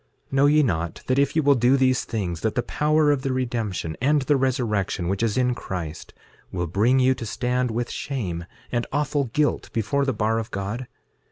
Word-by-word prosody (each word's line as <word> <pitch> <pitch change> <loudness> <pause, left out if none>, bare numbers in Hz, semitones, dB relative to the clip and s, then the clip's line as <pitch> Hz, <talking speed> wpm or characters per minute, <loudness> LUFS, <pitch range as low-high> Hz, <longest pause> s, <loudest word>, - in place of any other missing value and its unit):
6:9 - - -34
Know 135 +1 +4
ye 150 +1 +5
not 85 - -2
that 130 +1 +1
if 140 +1 +1
ye 160 - +4
will 140 0 +6
do 125 +1 +3
these 130 -1 +2
things, 90 -7 -3
that 110 - -1
the 120 - +1
power 150 +3 +2
of 140 -2 +1
the 135 - -1
redemption 115 -10 -2
and 145 +2 +3
the 145 +3 +2
resurrection, 120 -9 0
which 95 +3 -1
is 115 -1 0
in 125 -1 +2
Christ, 85 -8 -6 0.4
will 90 -1 -2
bring 105 +10 +2
you 130 0 +4
to 125 - -8
stand 125 +2 -1
with 120 +2 -2
shame 90 - -4 0.3
and 120 -1 -1
awful 145 -1 0
guilt 145 +5 0
before 115 +5 0
the 135 - +1
bar 110 -1 0
of 115 +1 -5
God? 105 +5 -4
125 Hz, 205 wpm, -24 LUFS, 105-135 Hz, 0.4 s, will